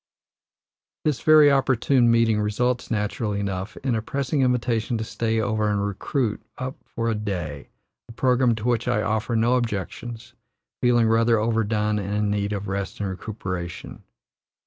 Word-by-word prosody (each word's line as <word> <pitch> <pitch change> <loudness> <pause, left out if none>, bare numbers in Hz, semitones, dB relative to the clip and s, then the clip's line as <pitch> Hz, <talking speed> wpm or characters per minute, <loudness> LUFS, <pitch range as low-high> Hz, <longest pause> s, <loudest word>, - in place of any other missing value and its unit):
This 150 -6 0
very 155 -2 +7
opportune 130 -2 +3
meeting 115 -2 +3
results, 125 +4 0
naturally 105 -1 -1
enough, 95 0 -4
in 130 -2 +1
a 110 - 0
pressing 140 +4 -1
invitation 120 -2 +1
to 110 - -3
stay 115 0 -1
over 110 -1 0
and 100 -1 0
recruit 105 +3 -2 0.2
up 130 +1 -4
for 115 -1 -4
a 115 - +2
day, 90 -9 -4 0.4
a - - -8
programme 125 0 +2
to 110 0 -6
which 120 -1 +1
I 105 - +1
offer 110 +2 -1
no 120 +3 +3
objections, 115 +1 -4 0.5
feeling 120 -2 +4
rather 115 +1 +3
overdone 105 -1 0
and 100 +1 -3
in 105 -1 +1
need 100 0 -1
of 100 0 -3
rest 95 0 -4
and 100 -2 -2
recuperation. 95 -3 -6
110 Hz, 155 wpm, -24 LUFS, 105-120 Hz, 0.5 s, very